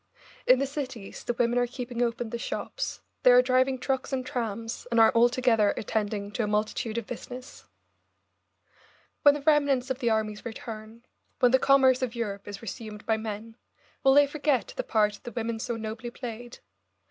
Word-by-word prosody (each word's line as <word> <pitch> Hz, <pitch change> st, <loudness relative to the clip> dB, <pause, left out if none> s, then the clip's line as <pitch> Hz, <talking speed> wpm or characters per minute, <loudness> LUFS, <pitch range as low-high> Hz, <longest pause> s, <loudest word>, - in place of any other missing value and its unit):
In 255 Hz, -, +7 dB
the 275 Hz, -, 0 dB
cities 260 Hz, -7 st, -6 dB
the 240 Hz, -, -2 dB
women 240 Hz, +1 st, +2 dB
are 245 Hz, -, +1 dB
keeping 245 Hz, -1 st, -5 dB
open 235 Hz, -1 st, -1 dB
the 235 Hz, -, -3 dB
shops, -, -, -4 dB, 0.2 s
they -, -, +6 dB
are 250 Hz, 0 st, +7 dB
driving 260 Hz, +1 st, +2 dB
trucks 265 Hz, +2 st, -2 dB
and 260 Hz, -1 st, -2 dB
trams, 230 Hz, -2 st, -4 dB
and 235 Hz, -, +2 dB
are 225 Hz, -, +7 dB
altogether 235 Hz, -3 st, +3 dB
attending 205 Hz, -2 st, -2 dB
to 240 Hz, -, -2 dB
a -, -, -1 dB
multitude 215 Hz, +2 st, -1 dB
of 230 Hz, -, -2 dB
business. 250 Hz, +2 st, -9 dB, 1.6 s
When 290 Hz, 0 st, +7 dB
the 290 Hz, -, -6 dB
remnants 280 Hz, -4 st, +3 dB
of 260 Hz, -, -2 dB
the 235 Hz, -, +1 dB
armies 215 Hz, -1 st, -1 dB
return, 225 Hz, 0 st, -8 dB, 0.3 s
when 250 Hz, -3 st, +5 dB
the 260 Hz, -, +5 dB
commerce 265 Hz, -2 st, +5 dB
of 250 Hz, -2 st, -2 dB
Europe 200 Hz, -4 st, -4 dB
is 205 Hz, +2 st, -8 dB
resumed 215 Hz, -1 st, -7 dB
by 220 Hz, -1 st, +2 dB
men, 220 Hz, +1 st, -6 dB, 0.5 s
will 270 Hz, 0 st, +6 dB
they 290 Hz, 0 st, +7 dB
forget 290 Hz, -3 st, 0 dB
the -, -, -2 dB
part 210 Hz, -1 st, +1 dB
the 240 Hz, -, -8 dB
women 230 Hz, 0 st, -3 dB
so 235 Hz, +1 st, -3 dB
nobly 225 Hz, +1 st, -5 dB
played? 240 Hz, -1 st, -8 dB
235 Hz, 180 wpm, -27 LUFS, 220-255 Hz, 1.6 s, In